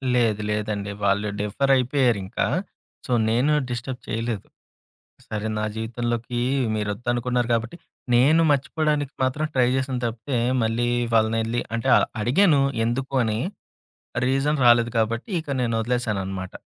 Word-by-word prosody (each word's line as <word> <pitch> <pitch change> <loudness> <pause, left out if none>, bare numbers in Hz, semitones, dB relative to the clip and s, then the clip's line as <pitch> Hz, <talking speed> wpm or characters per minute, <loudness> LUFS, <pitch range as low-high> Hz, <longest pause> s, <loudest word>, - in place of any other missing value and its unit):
లేదు. 110 -4 +2
లేదండి. 105 -1 -2
వాళ్ళు 100 +1 +2
డిఫర్ 110 +7 0
అయిపోయారింకా. 125 -5 +1 0.6
సో, - - -6 0.2
నేను 125 +7 +2 0.2
డిస్టర్బ్ 125 +1 -4
చేయలేదు. 115 -2 -3 0.8
సరే! 105 0 -3
నా 105 - -1
జీవితంలోకి 120 +1 -3 0.3
మీరొద్దనుకున్నారు 120 +3 -1
కాబట్టి, 115 +6 -3 0.4
నేను 145 +7 +5
మర్చిపోవడానికి 145 0 0
మాత్రం 150 +4 0
ట్రై 125 -2 +3
చేశాను 130 -1 -2
తప్పితే, 120 +4 -3 0.3
మళ్ళీ 115 +2 0 0.3
వాళ్ళనెళ్లి 115 +1 +1
అంటే 115 +3 -2 0.3
అడిగాను 145 - +4 0.2
ఎందుకు 130 +3 -2
అని. 110 -1 -1 0.9
రీజన్ 135 +3 +1
రాలేదు 120 0 +5
కాబట్టి 115 - -1
ఇక 155 - -9
నేనొదిలేసాననమాట. 110 -6 -2
120 Hz, 110 wpm, -24 LUFS, 110-130 Hz, 0.9 s, నేను